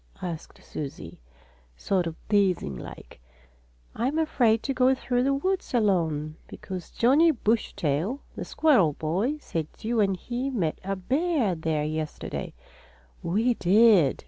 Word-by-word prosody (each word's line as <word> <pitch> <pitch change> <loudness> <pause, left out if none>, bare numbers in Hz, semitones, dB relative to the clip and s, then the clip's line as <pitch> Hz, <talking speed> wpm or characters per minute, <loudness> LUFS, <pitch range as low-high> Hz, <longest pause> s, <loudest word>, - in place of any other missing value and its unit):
asked 170 -3 -6
Susie, 145 -3 -7 0.6
sort 185 - 0
of 165 - -5
teasing 195 - +1
like. - - -11 0.7
"I'm 265 +7 -1
afraid 245 -8 +2
to 275 - -1
go 260 +1 +3
through 245 -1 -1
the 270 +2 +2
woods 370 0 -1
alone, 160 -8 +1
because 185 -3 -8
Johnnie 285 +8 +4
Bushytail, 210 - 0 0.2
the - - -4
squirrel 225 - +3
boy, 190 - -1
said 165 - -4
you 230 +1 -1
and 195 -3 +2
he 245 +7 -3
met 185 - -1
a 195 +1 -2
bear 265 - 0
there 160 -2 -1
yesterday." 155 0 -4 0.7
"We 220 +8 +1
did!" 195 - +4
205 Hz, 130 wpm, -26 LUFS, 165-255 Hz, 0.7 s, Johnnie